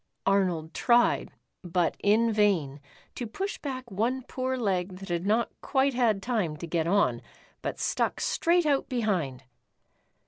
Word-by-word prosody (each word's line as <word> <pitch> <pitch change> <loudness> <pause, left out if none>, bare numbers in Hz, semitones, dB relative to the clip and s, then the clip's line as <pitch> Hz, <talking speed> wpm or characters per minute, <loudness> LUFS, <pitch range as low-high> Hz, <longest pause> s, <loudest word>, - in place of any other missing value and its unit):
Arnold 180 -5 +1
tried, 240 -1 +3 0.3
but 175 -1 0
in 220 +3 +3
vain, 180 -10 +2 0.3
to 240 - -5
push 390 - -4
back 260 -4 -6
one 240 +7 -1
poor 260 +1 -3
leg 190 -5 -1
that 195 0 -10
had 175 +2 -1
not 225 +3 +2
quite 275 0 +1
had 225 -5 +1
time 210 -11 -1
to 170 - -6
get 165 -1 -1
on, 200 +3 +2 0.4
but - - -3
stuck - - 0
straight 345 0 +2
out 285 -2 +1
behind. 185 - -1
210 Hz, 145 wpm, -28 LUFS, 180-250 Hz, 0.4 s, tried